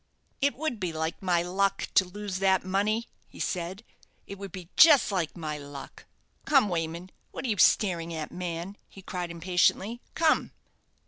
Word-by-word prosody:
"It 280 +1 +2
would 285 -5 -3
be 180 -3 -2
like 160 +1 -3
my 175 -3 +2
luck 195 +3 0
to 190 - +5
lose 195 0 -5
that 190 -1 +2
money," 210 +5 0 0.2
he - - -15
said; 180 +4 -3 0.4
"it 200 0 -9
would 200 -2 -7
be 180 -1 -9
just 295 -8 +7
like 180 -3 -2
my 155 -2 -4
luck. 140 -1 -10 0.4
Come, 270 -8 +4
Wayman. 170 +1 -3 0.2
What - - -6
are - - -1
you 210 - 0
staring 170 -5 +3
at, 160 -2 -5
man?" 180 +2 -5
he 195 - -14
cried 180 -2 -4
impatiently. 185 +6 +1
"Come." 320 -1 +2
185 Hz, 170 wpm, -28 LUFS, 170-205 Hz, 0.4 s, just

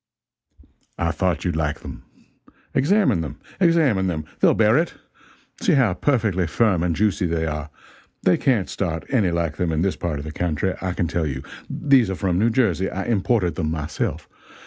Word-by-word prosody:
"I 85 -1 0
thought 90 -1 -1
you'd 85 -3 0
like 75 -2 -1
them. - - -9 0.7
Examine 190 - +3
them 75 -2 -6 0.2
examine 155 - +3
them 80 -4 -3
they'll - - +4
bear 110 +1 +4
it. 165 +4 +1 0.7
See 215 -7 +3
how 125 -10 +3
perfectly 105 - +1
firm 95 0 +2
and 85 -1 0
juicy 100 -2 +1
they 80 -1 -1
are 75 -1 -4 0.5
they - - +4
can't 120 -8 +1
start 80 -5 -3
any 110 -9 +2
like 85 -2 -1
them 90 -2 0
in 80 +1 0
this 95 - 0
part 85 -4 -3
of 70 - -6
the 75 - -5
country, 90 +3 -1
I 95 -1 -2
can 85 - -1
tell 85 -1 -1
you. 65 -2 -4 0.3
These 135 -7 +3
are 95 - -2
from 90 -1 0
New 115 +3 +3
Jersey 110 -5 +1
I 95 - -4
imported 105 -4 +1
them 80 -4 -2
myself. 75 -2 -3
90 Hz, 185 wpm, -22 LUFS, 80-115 Hz, 0.7 s, they'll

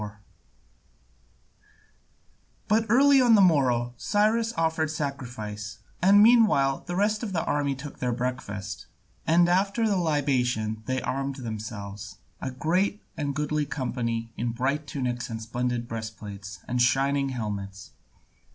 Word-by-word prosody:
4] 105 0 -7 2.5
But 220 +2 +3
early 275 +3 +6
on 240 -3 +6
the - - +5
morrow 130 -10 +3
Cyrus 220 - +1
offered 160 -1 +1
sacrifice, 120 -8 -5 0.2
and 200 +3 +7
meanwhile 215 - +4
the 175 - -3
rest 210 +2 +1
of 215 -5 -4
the 165 - 0
army 145 -1 0
took 140 +2 -9
their 125 -1 0
breakfast, 120 -5 -4 0.4
and 170 +2 +5
after 200 +5 +2
the 200 -2 +1
libation 125 -9 0
they 130 0 -1
armed 135 +1 -2
themselves, 110 -4 -7 0.2
a - - -2
great 180 +10 0
and 145 -3 -3
goodly 150 0 -1
company 115 -4 -3
in 120 0 -2
bright 140 +5 -1
tunics 125 -3 -3
and 110 -1 -4
splendid 120 +1 -2
breastplates 105 -4 -7
and 125 0 0
shining 135 +3 +2
helmets. 100 -5 -5
135 Hz, 130 wpm, -26 LUFS, 115-165 Hz, 2.5 s, and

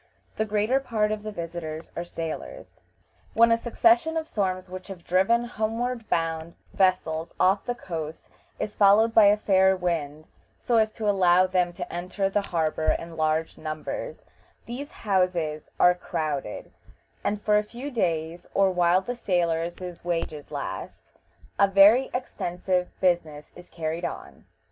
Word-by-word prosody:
The 220 - 0
greater 215 +5 +1
part 220 -5 0
of 215 -1 -2
the 215 0 -6
visitors 165 -3 -6
are 170 - -3
sailors. 175 - -7 0.5
When 230 +1 +6
a - - +6
succession 320 +7 +2
of 320 - -2
storms 190 - -2
which 185 0 -8
have 190 -4 -9
driven 195 +7 +2
homeward 235 +1 -3
bound 165 0 -1 0.2
vessels 170 -4 +1
off 190 +2 +3
the 245 - -2
coast 160 -7 -6 0.3
is 210 - -4
followed 210 +3 +5
by 220 -2 +7
a 205 +1 +6
fair 190 -2 +4
wind, 155 -4 -2 0.3
so 235 - +1
as 220 -1 +3
to 215 - -4
allow 185 -2 +4
them 180 -1 +1
to 175 0 -7
enter 185 +3 -2
the 205 - +1
harbor 160 -4 0
in 165 0 -9
large 155 0 -1
numbers, 155 - -5 0.4
these 270 +5 -6
houses 180 - -1
are 180 - +6
crowded, 150 -9 -4 0.5
and 205 - -1
for 210 0 +3
a - - -2
few 245 +7 -7
days, 170 - -2
or 195 -1 +4
while 175 0 +3
the 245 +6 -4
sailors' 175 -4 -2
wages 165 -4 -3
last, - - -6 0.6
a 200 - +6
very 200 +7 +6
extensive 180 -7 -2
business 160 -5 0
is 175 - -13
carried 165 +1 -4
on. - - -7
185 Hz, 150 wpm, -26 LUFS, 170-215 Hz, 0.6 s, by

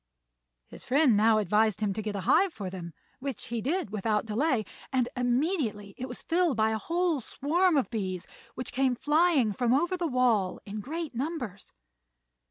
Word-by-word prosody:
His - - -11
friend 270 -3 +4
now 220 +1 +4
advised 215 +1 +2
him 210 -2 0
to 215 - -3
get 210 -1 -4
a 200 - -2
hive 370 - +3
for 195 -4 -5
them, 175 -2 -7 0.3
which 270 -4 -5
he 235 -1 -2
did 295 - -1
without 210 +1 0
delay; 225 +1 0 0.3
and 255 -2 +2
immediately 245 - 0
it 255 - -5
was 245 - -7
filled 340 -5 +1
by 220 0 +3
a 220 - -1
whole 340 - 0
swarm 330 +8 +1
of 265 - 0
bees, 185 -5 -3 0.3
which 255 - -5
came 260 -1 +2
flying 295 -4 +3
from 245 +4 +2
over 345 +6 +1
the 350 -2 -1
wall 240 -8 +2
in 210 +1 -5
great 315 +7 -5
numbers. 245 - -4
245 Hz, 180 wpm, -28 LUFS, 215-300 Hz, 0.3 s, friend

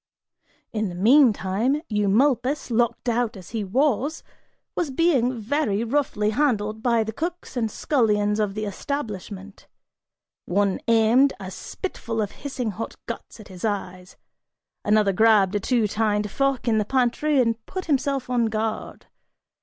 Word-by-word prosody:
In 215 -2 -1
the 175 - -7
meantime, 235 - +3
Eumolpus, 240 +7 +1
locked 235 +2 0
out 235 -2 0
as 185 - -12
he 220 -2 -2
was, 275 +7 0 0.5
was 340 -4 -1
being 260 -5 +2
very 225 -2 0
roughly 235 -4 0
handled 220 -5 0
by 235 -2 +2
the 220 0 -5
cooks 345 +2 -5
and 230 -3 0
scullions 210 -5 +1
of 205 -2 -1
the 215 0 -2
establishment; 205 -4 -6 0.8
one 200 +1 +1
aimed 230 +4 +4
a 190 -1 -7
spitful 230 - -5
of 210 -2 -1
hissing 260 -5 -4
hot 215 +4 -6
guts - - -7
at 210 - -12
his 185 -2 -11
eyes; 185 -4 -4 0.7
another 210 -1 +3
grabbed 210 -2 +4
a 205 - +1
two 230 +1 +1
tined 210 -1 0
fork 275 -1 0
in 220 -2 +3
the - - +2
pantry 265 +4 +1
and 230 -2 +1
put 375 -1 -5
himself 275 -3 0
on 245 -2 +1
guard. 220 0 -3
225 Hz, 145 wpm, -24 LUFS, 210-265 Hz, 0.8 s, aimed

